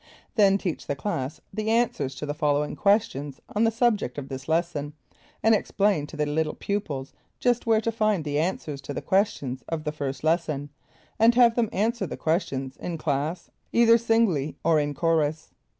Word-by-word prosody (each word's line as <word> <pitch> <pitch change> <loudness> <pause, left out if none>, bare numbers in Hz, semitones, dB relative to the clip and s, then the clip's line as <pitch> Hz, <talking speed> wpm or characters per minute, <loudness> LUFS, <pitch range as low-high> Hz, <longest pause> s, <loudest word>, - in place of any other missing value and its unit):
Then 195 -3 +5
teach 180 -5 -4
the 140 - -1
class 140 -4 -3
the 215 0 -2
answers 225 - +1
to 150 - -5
the 145 - -2
following 150 -1 0
questions 150 -10 +1 0.2
on 215 +2 +3
the - - +4
subject 225 - +1
of 140 -2 -6
this 135 +1 -7
lesson, 160 -3 -1 0.5
and 225 +1 +5
explain 200 -7 +1
to 155 - -10
the 150 - +1
little 155 +1 -1
pupils 150 -10 -3 0.3
just 245 -1 +1
where 220 -1 +4
to 230 - -1
find 215 -6 +1
the 145 0 0
answers 155 -4 -2
to 140 +1 -6
the - - -3
questions 145 -10 0
of 160 -2 -3
the 150 - -2
first 140 -2 -4
lesson, 155 -3 0 0.5
and 230 +2 +5
have 240 -2 +6
them 230 -2 +1
answer 220 -1 0
the - - -6
questions 135 -5 -1
in 175 -2 -4
class 155 +3 -2 0.2
either 230 0 +5
singly 220 -11 +1
or 160 -1 +4
in 145 -1 -1
chorus. 160 -1 0
165 Hz, 180 wpm, -26 LUFS, 145-215 Hz, 0.5 s, have